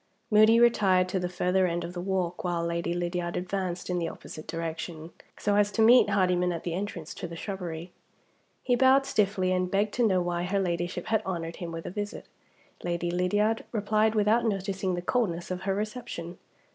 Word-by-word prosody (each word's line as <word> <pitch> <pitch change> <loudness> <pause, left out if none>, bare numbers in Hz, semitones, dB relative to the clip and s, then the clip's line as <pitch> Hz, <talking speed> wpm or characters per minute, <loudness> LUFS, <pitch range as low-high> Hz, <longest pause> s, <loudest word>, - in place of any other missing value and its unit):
Moody 215 +2 +6
retired 195 -6 +4
to 190 - 0
the 180 0 -2
further 180 +1 +1
end 170 0 -2
of 170 +1 -6
the 175 - -4
walk, 180 -2 -2
while 175 -2 -1
Lady 170 0 -2
Lydiard 175 0 -2
advanced 180 -1 -3
in 180 -1 -1
the 165 -1 -1
opposite 155 - -10
direction, 165 0 -5 0.3
so 205 -1 +1
as 205 0 +3
to 220 +2 +2
meet 245 +3 +7
Hardyman 180 -2 +2
at 170 - -4
the 170 - -3
entrance 175 -4 -4
to 175 - -6
the 170 - -8
shrubbery. 175 -2 -5 0.7
He 250 - +2
bowed 265 +2 +5
stiffly, 200 -7 +1
and 185 0 +1
begged 200 +2 +1
to 240 -2 +3
know 190 -3 +2
why 175 -1 -1
her 200 +2 0
Ladyship 175 -1 -2
had 220 -1 +1
honored 170 -3 -4
him 170 -2 -5
with 165 0 -6
a - - -4
visit. 205 +1 -5 0.6
Lady 175 0 -1
Lydiard 205 +5 +1
replied 215 0 +1
without 215 +3 +3
noticing 195 -3 -1
the 175 - -4
coldness 180 -6 -1
of 185 0 -3
her 190 - +2
reception. 210 -5 -5
185 Hz, 195 wpm, -28 LUFS, 175-205 Hz, 0.7 s, meet